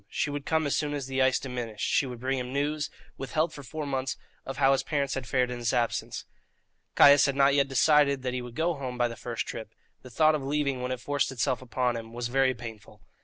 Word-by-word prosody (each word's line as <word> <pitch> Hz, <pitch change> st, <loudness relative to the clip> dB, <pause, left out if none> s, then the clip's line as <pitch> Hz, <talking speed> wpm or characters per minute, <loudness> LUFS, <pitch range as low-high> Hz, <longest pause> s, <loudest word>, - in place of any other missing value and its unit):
She 145 Hz, -, -1 dB
would 145 Hz, -1 st, -5 dB
come 160 Hz, -1 st, +1 dB
as 145 Hz, -, +1 dB
soon 145 Hz, -1 st, -1 dB
as 140 Hz, -2 st, -4 dB
the 135 Hz, 0 st, -1 dB
ice 130 Hz, 0 st, +4 dB
diminished; 120 Hz, -5 st, -4 dB
she 140 Hz, -, +2 dB
would 125 Hz, -2 st, -7 dB
bring 130 Hz, +2 st, -1 dB
him 125 Hz, 0 st, -5 dB
news, 145 Hz, +2 st, -1 dB, 0.3 s
withheld 155 Hz, +5 st, -1 dB
for 145 Hz, -, -8 dB
four 150 Hz, +4 st, -6 dB
months, 135 Hz, -1 st, -2 dB, 0.3 s
of 135 Hz, -1 st, -5 dB
how 135 Hz, 0 st, +4 dB
his 135 Hz, -, +3 dB
parents 140 Hz, -3 st, -1 dB
had 130 Hz, -3 st, -4 dB
fared 125 Hz, +1 st, +1 dB
in 120 Hz, -, -5 dB
his 120 Hz, 0 st, 0 dB
absence. 120 Hz, -2 st, -1 dB, 0.7 s
Caius 145 Hz, 0 st, +7 dB
had 140 Hz, -, -1 dB
not 140 Hz, 0 st, +4 dB
yet 140 Hz, -1 st, +3 dB
decided 140 Hz, 0 st, +3 dB
that 125 Hz, -1 st, -2 dB
he 125 Hz, -, -2 dB
would 120 Hz, -1 st, -9 dB
go 170 Hz, +2 st, +1 dB
home 130 Hz, -4 st, -5 dB
by 120 Hz, 0 st, +2 dB
the 115 Hz, -, -7 dB
first 120 Hz, 0 st, -4 dB
trip; 110 Hz, -1 st, -7 dB, 0.3 s
the 130 Hz, -, -12 dB
thought 155 Hz, +6 st, +4 dB
of 150 Hz, -, -1 dB
leaving, 140 Hz, -2 st, -1 dB
when 125 Hz, 0 st, -2 dB
it 130 Hz, -, -3 dB
forced 145 Hz, +1 st, -1 dB
itself 130 Hz, +1 st, -1 dB
upon 125 Hz, -1 st, -1 dB
him, 115 Hz, 0 st, -7 dB
was 120 Hz, 0 st, -3 dB
very 130 Hz, 0 st, +2 dB
painful. 115 Hz, -2 st, -10 dB
135 Hz, 245 wpm, -28 LUFS, 125-145 Hz, 0.7 s, Caius